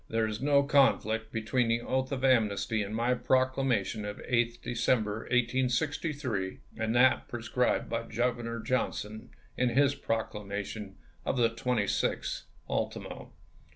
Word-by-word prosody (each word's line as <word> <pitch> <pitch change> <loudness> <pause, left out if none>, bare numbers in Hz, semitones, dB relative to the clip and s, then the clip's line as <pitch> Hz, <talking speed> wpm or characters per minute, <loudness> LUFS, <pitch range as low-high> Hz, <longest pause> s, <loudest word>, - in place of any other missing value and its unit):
There 115 0 +1
is 110 +1 -4
no 140 0 +4
conflict 115 -6 +2
between 115 +2 0
the 115 +1 +1
oath 130 +2 -1
of 135 -1 -1
amnesty 110 -3 +2
in 100 0 -4
my 120 +3 +1
Proclamation 130 -4 +1
of 105 0 -5
8th 120 -1 0
Decem 120 -1 +1
ber, 105 +1 -3
1863, 125 - 0 0.2
and 110 +1 -1
that 130 +2 +4
prescribed 120 +1 0
by 115 0 -3
Governor 120 0 -1
John 130 +2 0
son 110 +3 -7 0.3
in 125 -1 +2
his 140 +3 +3
proclamation 105 -3 -4 0.3
of - - -1
the 115 -2 +3
26th 115 -3 -1 0.2
ultimo. - - -4
120 Hz, 135 wpm, -30 LUFS, 110-130 Hz, 0.3 s, no